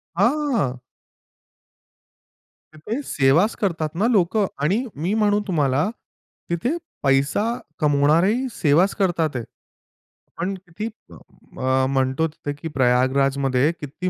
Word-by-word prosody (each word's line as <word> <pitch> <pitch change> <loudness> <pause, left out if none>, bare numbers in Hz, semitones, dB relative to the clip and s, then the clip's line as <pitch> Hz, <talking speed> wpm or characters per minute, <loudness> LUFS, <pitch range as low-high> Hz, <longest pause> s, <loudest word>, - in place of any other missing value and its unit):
हां. 235 - +1 1.9
तिथे 210 - -4
सेवाच 150 +10 +3
करतात 165 -6 0
ना 205 +6 +2
लोकं. 200 +1 +2 0.2
आणि 205 - +1
मी 170 +7 -2
म्हणू 205 0 +3
तुम्हाला, 145 -1 +1 0.6
तिथे 240 - -1 0.3
पैसा 140 +6 +2 0.4
कमावणारेही 160 - +3
सेवाच 170 +1 +2
करत 185 -5 0
आहेत. 145 -7 0 0.9
पण 180 +4 -2
किती 190 +3 -7 0.7
अ, 130 0 +1
म्हणतो 135 +3 +1
तिथे 145 -2 -6
की 145 +3 -7
प्रयागराजमध्ये 135 +2 +2
किती 150 +5 -4
160 Hz, 100 wpm, -22 LUFS, 140-200 Hz, 1.9 s, सेवाच